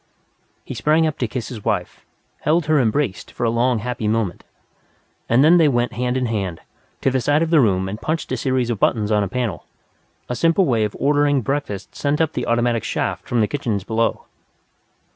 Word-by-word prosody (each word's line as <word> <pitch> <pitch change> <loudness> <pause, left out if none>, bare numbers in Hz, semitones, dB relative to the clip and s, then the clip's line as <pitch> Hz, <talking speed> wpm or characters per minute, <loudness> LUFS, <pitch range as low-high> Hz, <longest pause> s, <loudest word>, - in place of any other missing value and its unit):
He - - -6
sprang 150 +7 +2
up 155 -2 -2
to 125 - 0
kiss 115 0 -5
his 110 -5 -8
wife, - - -2 0.4
held 160 +1 +1
her 155 -1 +3
embraced 120 -3 0
for - - -6
a 115 - +2
long 120 +1 +2
happy 115 0 -3
moment. 110 -5 -1 0.9
And 120 +4 +5
then 165 +4 +6
they 165 -3 +5
went 120 -3 +1
hand 125 +2 -1
in 130 - 0
hand, 100 -7 -2 0.4
to 135 - +2
the 130 0 0
side 145 +5 +2
of 165 - -2
the 165 - +6
room 95 -5 +2
and 105 +4 -6
punched 155 +3 -2
a 130 - 0
series 130 -1 0
of 110 - -3
buttons 105 0 +1
on 105 -1 +3
a - - -2
panel 115 -5 -3 0.6
a 125 - -3
simple 165 +6 +3
way 115 -7 +2
of 105 - -5
ordering 145 -1 +2
breakfast 135 -7 -3
sent 145 +1 -1
up 160 -1 +1
the 125 - -3
automatic 120 -1 +1
shaft - - -3
from 120 -2 +1
the 105 - +2
kitchens 115 -8 -2
below. 115 +3 -1
125 Hz, 205 wpm, -21 LUFS, 110-145 Hz, 0.9 s, then